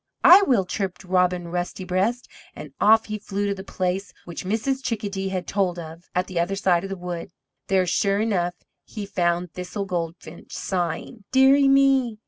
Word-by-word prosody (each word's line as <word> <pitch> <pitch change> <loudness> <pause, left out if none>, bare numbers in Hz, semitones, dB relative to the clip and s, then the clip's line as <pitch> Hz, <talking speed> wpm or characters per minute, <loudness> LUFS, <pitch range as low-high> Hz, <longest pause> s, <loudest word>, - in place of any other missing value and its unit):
"I 370 +3 +9
will," 245 - +2
chirped 190 0 -4
Robin 180 -1 +1
Rusty 175 +2 -3
breast, 195 +7 -1 0.3
and - - -9
off 220 +2 +5
he 215 0 -5
flew 205 0 -3
to 200 - 0
the 190 -1 -8
place 185 0 -3
which 175 +1 -7
Mrs. 245 +7 -1
Chickadee 200 -5 -3
had 185 -2 -3
told 190 -3 0
of, 165 +1 -9
at 180 0 +1
the 185 -3 -3
other 175 +3 0
side 180 -3 +2
of 195 - -5
the 195 - -4
wood. 175 +1 -6 0.4
There, 190 -1 +2
sure 195 +3 +1
enough, 180 -5 0 0.3
he 210 -2 -7
found 175 -3 -1
Thistle 180 +3 -5
Goldfinch 170 -2 -6
sighing: 185 +4 -3
"Dear 265 +1 +6
ie 280 -1 +4
me! 270 -4 +3
190 Hz, 180 wpm, -24 LUFS, 180-215 Hz, 0.4 s, I